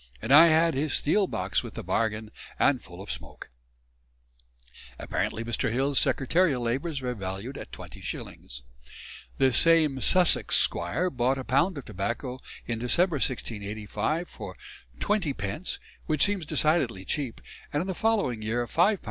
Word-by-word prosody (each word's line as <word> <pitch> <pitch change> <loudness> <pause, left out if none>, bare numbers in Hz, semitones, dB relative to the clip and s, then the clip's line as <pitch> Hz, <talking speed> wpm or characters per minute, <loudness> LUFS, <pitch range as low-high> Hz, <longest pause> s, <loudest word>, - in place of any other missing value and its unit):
and 120 - -4
I 160 +4 +10
had 165 +1 +4
his 145 +2 -1
steel 195 +6 +2
box 90 - -1
with - - -9
the - - -5
bargain, 110 -1 -1 0.3
and 135 -3 +3
full 90 +1 -10
of 100 - -5
smoake." - - -8 1.5
Apparently 115 - -2
Mr. 115 -1 -1
Hill's 135 +3 +2
secretarial 145 0 +2
labours 135 +5 -2
were 125 -1 -2
valued 100 +4 -5
at - - -8
20s. - - -8 0.7
This 130 -2 +3
same 155 -5 +4
Sussex 180 -2 +3
squire 145 - +1
bought 130 +1 +1
a 130 - -4
pound 145 +8 +1
of 140 - -7
tobacco 120 +6 -4 0.3
in 115 -1 -3
December 165 +8 +2
1685 110 - -2
for - - -9 0.4
20d., 160 - -2 0.3
which 155 -2 +3
seems 200 -6 -2
decidedly 130 - +1
cheap, 135 -6 -3 0.3
and 145 - 0
in - - -3
the 190 - -2
following 200 - 0
year 115 +3 -1
a - - -7
5 195 - +3
lb. - - -27
135 Hz, 150 wpm, -27 LUFS, 115-165 Hz, 1.5 s, I